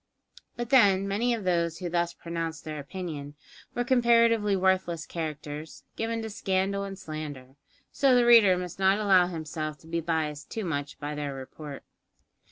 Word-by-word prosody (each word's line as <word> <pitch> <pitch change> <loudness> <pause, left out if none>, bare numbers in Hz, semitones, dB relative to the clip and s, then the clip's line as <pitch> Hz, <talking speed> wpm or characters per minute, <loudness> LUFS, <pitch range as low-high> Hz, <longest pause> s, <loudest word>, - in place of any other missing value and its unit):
But 240 0 -4
then, 200 -7 +5
many 220 +5 +1
of 220 - -6
those 170 -2 +1
who 180 - -4
thus 170 0 0
pronounced 165 -3 -5
their 155 -1 -5
opinion, 145 -2 -6 0.4
were 245 - +1
comparatively 230 -4 +4
worthless 185 -3 +1
characters, 155 -1 -6
given 225 0 -2
to 220 - -4
scandal 195 0 0
and 195 -1 -6
slander; 145 -6 -7 0.4
so 270 -2 +4
the 245 -1 +4
reader 225 -6 +7
must 180 0 -6
not 190 +1 +4
allow 190 -4 +4
himself 155 -2 -5
to 160 - -17
be 170 +1 -2
biassed 155 -3 -2
too 220 -3 -4
much 145 -4 -3
by 145 +1 -4
their 145 -2 -4
report. 140 +2 -9
175 Hz, 165 wpm, -28 LUFS, 155-200 Hz, 0.4 s, reader